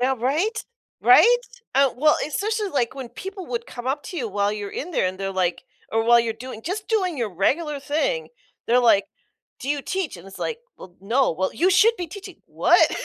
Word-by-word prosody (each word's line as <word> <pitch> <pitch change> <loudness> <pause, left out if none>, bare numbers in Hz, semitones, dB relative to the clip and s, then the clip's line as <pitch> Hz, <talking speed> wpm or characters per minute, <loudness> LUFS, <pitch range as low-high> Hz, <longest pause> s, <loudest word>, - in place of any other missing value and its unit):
Yeah. 265 +2 +2
Right? 320 - 0 0.4
Right? 485 +1 +7 0.4
Uh, 275 0 +5
well, 300 +3 +4
especially, 420 +7 -1
like, 245 -3 0
when 265 -3 -7
people 380 - -8
would 470 -1 -4
come 245 0 -8
up 280 +2 -1
to 355 - -7
you 240 -7 -2
while 200 0 0
you're 205 -1 -5
in 340 - -5
there 280 - +1
and 185 +1 -4
they're 195 0 -3
like 180 -2 0 0.3
or 225 0 +2
while 235 +1 +6
you're 230 -1 +1
doing 225 0 -9
just 405 +4 -4
doing 375 -8 0
your 230 -5 -2
regular 290 - 0
thing, 320 - -1 0.4
they're 245 +2 +4
like, 215 -4 +4 0.6
"Do 265 - -6
you 290 0 0
teach?" 375 - -3
And 170 - -13
it's 195 - -11
like, 465 - -3 0.2
"Well, 180 -1 -13
no." 240 +7 +2
"Well, 190 +4 -2
you 365 +3 +3
should 425 +6 +5
be 350 -3 -4
teaching." 390 +3 -10
What? - - +4
275 Hz, 210 wpm, -23 LUFS, 225-370 Hz, 0.6 s, Right